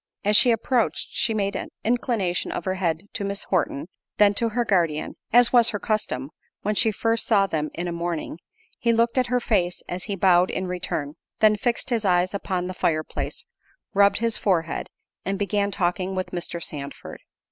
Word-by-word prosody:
As 210 +1 +4
she 245 - +7
approached, 230 +1 +1
she 235 - +1
made 200 -2 -1
an - - -4
inclination 225 -6 0
of - - -4
her 185 - 0
head 175 -3 -1
to - - -3
Mrs. 200 +1 -2
Horton, 165 -5 0 0.3
then 205 -1 +5
to 230 +3 +1
her 240 +2 0
guardian, 170 -7 0 0.2
as 245 +1 +5
was 240 -2 +6
her 205 - -3
custom, 160 - -2 0.3
when 210 - +1
she 220 +1 +3
first 225 +2 0
saw 200 -3 +4
them 155 -5 -2
in 175 +2 -3
a - - -2
morning—he 170 +6 -4
looked 230 +2 +2
in 255 - +2
her 250 +1 +1
face 180 -7 0
as 180 +1 -4
he 200 - -3
bowed 180 -1 +4
in 185 - -2
return, 160 -5 -3 0.2
then 215 -1 +5
fixed 240 +4 -2
his 230 -2 +1
eyes 180 -1 +2
upon 185 -2 -2
the 185 - -4
fire 155 -3 0
place, - - -5 0.5
rubbed 200 0 +5
his 230 0 +1
forehead, 170 -5 0 0.3
and 195 +1 -2
began 200 0 0
talking 185 0 -1
with 185 0 -3
Mr. 175 -1 -4
Sandford. 140 -2 -7
195 Hz, 190 wpm, -24 LUFS, 175-220 Hz, 0.5 s, she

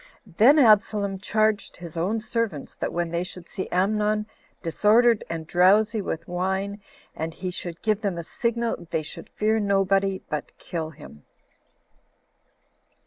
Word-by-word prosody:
Then 240 - +5
Absalom 210 -5 +4
charged 215 +1 0
his 170 -2 -9
own 195 +7 0
servants, 220 - -2
that - - -3
when 170 -1 -2
they 170 +1 -1
should 180 -1 -9
see 190 - -5
Amnon 210 +3 +1 0.4
disordered 215 +7 +4
and 165 -1 -4
drowsy 205 +6 +4
with 170 -3 -4
wine, 190 +3 -2 0.3
and 160 +1 -4
he 185 -1 -4
should 175 -1 -6
give 215 -1 +1
them 195 -5 -1
a 170 - -4
signal, 235 -2 -2
they 160 -2 -1
should - - -9
fear 220 +1 +1
nobody, 195 -1 +1
but 150 - -5
kill 160 -2 -4
him. 145 - -14
195 Hz, 140 wpm, -25 LUFS, 170-215 Hz, 0.4 s, Then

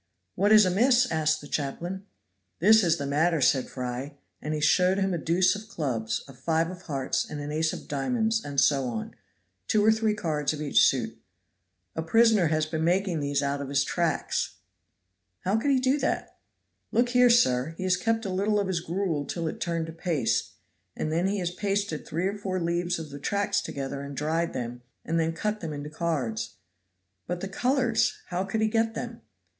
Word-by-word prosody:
"What 205 +3 +2
is 215 -2 +8
amiss?" 240 +7 +3
asked 155 -1 +1
the 145 - -10
chaplain. 175 +8 -4 0.5
"This 220 +5 +6
is 170 -1 +3
the 140 - -3
matter," 155 +4 +2
said 130 -1 +3
Fry, 125 +3 -5 0.3
and 155 +1 -2
he - - -2
showed 180 +5 +3
him 195 -1 +1
a 170 - -1
deuce 180 +4 +2
of 210 +1 -8
clubs, 125 - -2
a 135 - -12
five 165 +5 0
of 180 -1 -10
hearts 140 -7 -1
and 150 - -5
an 145 0 -5
ace 160 +1 +1
of - - -8
diamonds, 220 - 0
and 140 -1 -1
so 135 -1 +3
on; 115 -3 -4 0.5
two 210 -1 +3
or 220 - +7
three 220 -1 +1
cards 155 -7 -1
of 150 - -6
each 145 - +4
suit. - - -2 0.7
"A 160 - -1
prisoner 220 +1 +4
has 155 0 +1
been 160 0 -3
making 180 0 +1
these 145 0 0
out 140 0 -1
of 140 - -5
his 140 0 +2
tracts!" 170 +1 -1 0.9
"How 190 +3 0
could 255 +6 0
he 275 - +4
do 260 +3 +2
that?" 275 - -2 0.6
"Look 240 +1 +2
here, 250 0 +5
sir. 160 - +3
He - - -4
has 185 -1 +3
kept 225 +4 -1
a - - -2
little 205 +3 +1
of 200 - 0
his 190 -3 -1
gruel 170 -3 -2
till 170 +2 -3
it - - -5
turned 170 -2 -1
to 165 - -8
paste, 165 -3 -1 0.4
and 155 - -2
then 170 +4 +1
he 205 +1 0
has 175 -2 -2
pasted 200 -3 -2
three 165 +3 -2
or 200 +2 -2
four 185 -2 -2
leaves 175 +1 0
of 160 -3 -7
the 140 - -7
tracts 200 +5 0
together 140 -3 -5
and 140 -1 -7
dried 165 +3 0
them, 120 0 -5 0.2
and 165 +1 0
then 165 0 0
cut 210 +5 -2
them 165 -5 -5
into 145 +1 -6
cards." 140 -10 -2 0.7
"But 175 0 -3
the 195 - -3
colors 245 +3 +1
how 180 +1 -1
could 220 +3 -2
he 220 - +3
get 225 0 0
them?" 235 -1 -6
170 Hz, 205 wpm, -27 LUFS, 150-205 Hz, 0.9 s, is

